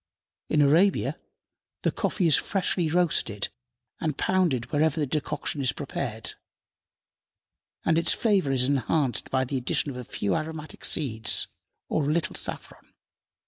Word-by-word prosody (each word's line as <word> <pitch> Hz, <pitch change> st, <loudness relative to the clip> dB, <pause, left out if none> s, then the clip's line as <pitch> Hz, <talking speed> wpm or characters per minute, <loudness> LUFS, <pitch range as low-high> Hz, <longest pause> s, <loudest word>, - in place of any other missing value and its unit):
In 150 Hz, -2 st, +4 dB
Arabia 170 Hz, +8 st, +3 dB, 0.6 s
the -, -, +2 dB
coffee 185 Hz, -, -1 dB
is 160 Hz, -, +6 dB
freshly 180 Hz, -4 st, 0 dB
roasted 155 Hz, -, +1 dB, 0.5 s
and 155 Hz, -3 st, -2 dB
pounded 170 Hz, -11 st, +1 dB
whenever 155 Hz, +1 st, +2 dB
the 150 Hz, -, +1 dB
decoction 145 Hz, 0 st, -2 dB
is 130 Hz, -1 st, +4 dB
prepared, 120 Hz, -5 st, -4 dB, 1.5 s
and 165 Hz, 0 st, +3 dB
its 170 Hz, -, +3 dB
flavor 200 Hz, -, +2 dB
is 130 Hz, -2 st, +2 dB
enhanced 135 Hz, 0 st, 0 dB
by 130 Hz, 0 st, +1 dB
the 135 Hz, +2 st, -2 dB
addition 130 Hz, +3 st, 0 dB
of 125 Hz, -, -8 dB
a 125 Hz, -, -5 dB
few 100 Hz, -5 st, -2 dB
aromatic 155 Hz, 0 st, -4 dB
seeds 110 Hz, -6 st, +2 dB, 0.4 s
or 145 Hz, -2 st, 0 dB
a -, -, +2 dB
little 170 Hz, -1 st, -1 dB
saffron. -, -, -5 dB
150 Hz, 140 wpm, -26 LUFS, 130-165 Hz, 1.5 s, is